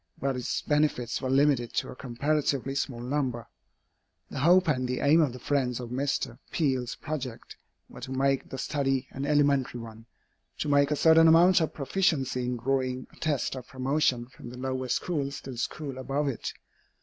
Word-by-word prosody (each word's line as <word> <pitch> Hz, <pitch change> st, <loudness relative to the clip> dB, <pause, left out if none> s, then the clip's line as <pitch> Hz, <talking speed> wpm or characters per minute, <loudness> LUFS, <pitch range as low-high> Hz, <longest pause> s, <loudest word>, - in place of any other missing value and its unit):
But 135 Hz, 0 st, -1 dB
its 125 Hz, -1 st, -2 dB
benefits 145 Hz, -5 st, 0 dB
were 130 Hz, -, -2 dB
limited 135 Hz, -3 st, +2 dB
to -, -, -1 dB
a -, -, -8 dB
comparatively 135 Hz, +1 st, -1 dB
small 130 Hz, -3 st, -3 dB
number. 125 Hz, -3 st, -2 dB, 0.8 s
The -, -, -4 dB
hope 175 Hz, +5 st, +5 dB
and 130 Hz, -4 st, +1 dB
the 125 Hz, 0 st, -2 dB
aim 155 Hz, +4 st, +5 dB
of 145 Hz, -5 st, +2 dB
the 125 Hz, -, -8 dB
friends 125 Hz, -2 st, -1 dB
of 120 Hz, -1 st, -7 dB
Mr. 130 Hz, -2 st, -2 dB
Peale's 130 Hz, -6 st, 0 dB
project 130 Hz, -6 st, -6 dB, 0.3 s
were -, -, -12 dB
to 130 Hz, +1 st, -6 dB
make 135 Hz, 0 st, 0 dB
the 135 Hz, -, -6 dB
study 135 Hz, -1 st, -1 dB
an 135 Hz, +2 st, -4 dB
elementary 140 Hz, -4 st, +2 dB
one 115 Hz, 0 st, -10 dB, 0.5 s
to -, -, -2 dB
make 140 Hz, -1 st, +4 dB
a 150 Hz, -, +1 dB
certain 165 Hz, +2 st, +6 dB
amount 175 Hz, +3 st, +6 dB
of 160 Hz, -, -1 dB
proficiency 135 Hz, -5 st, 0 dB
in 125 Hz, 0 st, -2 dB
drawing 130 Hz, +1 st, -1 dB
a -, -, -19 dB
test 150 Hz, -5 st, -1 dB
of 130 Hz, -2 st, -7 dB
promotion 130 Hz, -2 st, 0 dB
from 125 Hz, -1 st, -12 dB
the 125 Hz, -, -10 dB
lower 130 Hz, 0 st, -3 dB
schools 140 Hz, +1 st, -2 dB
to 135 Hz, -, -8 dB
the 125 Hz, -, -8 dB
schools 140 Hz, +1 st, -4 dB
above 140 Hz, +3 st, -1 dB
it. 125 Hz, -, -4 dB
135 Hz, 185 wpm, -28 LUFS, 125-145 Hz, 0.8 s, certain